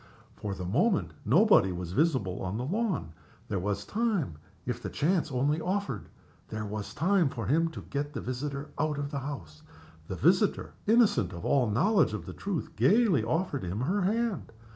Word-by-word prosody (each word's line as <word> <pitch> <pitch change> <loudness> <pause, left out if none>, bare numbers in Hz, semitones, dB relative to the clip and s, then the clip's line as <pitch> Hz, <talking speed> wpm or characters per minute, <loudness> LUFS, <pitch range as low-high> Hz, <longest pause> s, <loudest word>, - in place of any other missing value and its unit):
For 100 -2 -4
the 90 - -5
moment 150 - +2
nobody 175 - +5
was 90 -1 -5
visible 110 - +1
on 95 +3 -3
the 125 - -2
lawn. 185 - -1 0.4
There 100 - 0
was 100 +2 -2
time, 205 - -1 0.3
if 125 -1 -3
the - - -4
chance 165 +1 +1
only 145 +5 +1
offered 185 - -2 0.4
there 110 -1 -4
was 105 0 -5
time 175 -2 +3
for 115 -5 -5
him 165 +7 +2
to 160 - -8
get 145 +1 -3
the 120 - -3
visitor 140 +4 -4
out 155 -2 0
of 145 0 -3
the 140 - -2
house. 95 - -7 0.5
The 95 - -4
visitor, 185 - +2
innocent 215 - +4
of 85 -1 -7
all 130 -5 +3
knowledge 165 - +3
of 105 - -4
the - - -7
truth, 195 -6 -4
gayly 200 - +4
offered 145 +3 -1
him 90 +5 -3
her 185 +10 +1
hand. 215 - 0
140 Hz, 180 wpm, -29 LUFS, -, 0.5 s, nobody